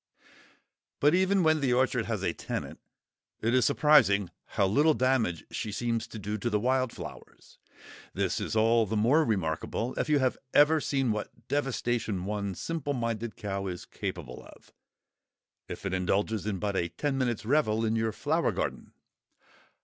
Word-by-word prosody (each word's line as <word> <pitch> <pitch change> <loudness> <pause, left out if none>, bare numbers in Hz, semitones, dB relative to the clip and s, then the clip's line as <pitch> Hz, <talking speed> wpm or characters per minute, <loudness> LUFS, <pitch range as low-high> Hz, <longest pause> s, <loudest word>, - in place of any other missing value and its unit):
But 145 +2 +4
even 190 +1 +3
when 155 -1 +3
the 130 -3 +2
orchard 130 -1 +1
has - - -2
a - - 0
tenant, - - -5 0.6
it 115 +2 0
is 130 -1 +4
surprising 120 - +4
how 100 - 0
little 145 +11 +3
damage 125 -10 +1
she 105 - -4
seems 115 +1 -2
to - - -9
do 105 +1 -4
to 120 - -1
the 105 -2 +1
wild 130 +1 +1
flowers. - - -11 0.5
This - - -1
is - - -3
all 115 0 +4
the 110 +2 -1
more 130 +10 +4
remarkable 105 - -1
if - - -1
you 150 - +4
have 130 -2 0 0.2
ever 150 +2 +6
seen 135 -5 0
what 105 -1 -6
devastation 120 -8 -1
one 100 -2 -3
simple 155 - -3
minded 115 -2 -3
cow 100 -1 -3
is 90 -1 -5
capable - - -6
of, - - -18 0.9
if - - -7
it 95 - -2
indulges 100 +3 0
in 100 -3 -1
but 100 +1 -2
a 85 -2 0
ten 135 - -2
minutes' 120 -4 -1
revel 115 -4 +2
in 110 0 +1
your 115 0 0
flower - - 0
garden! - - -4
115 Hz, 165 wpm, -29 LUFS, 105-135 Hz, 0.9 s, ever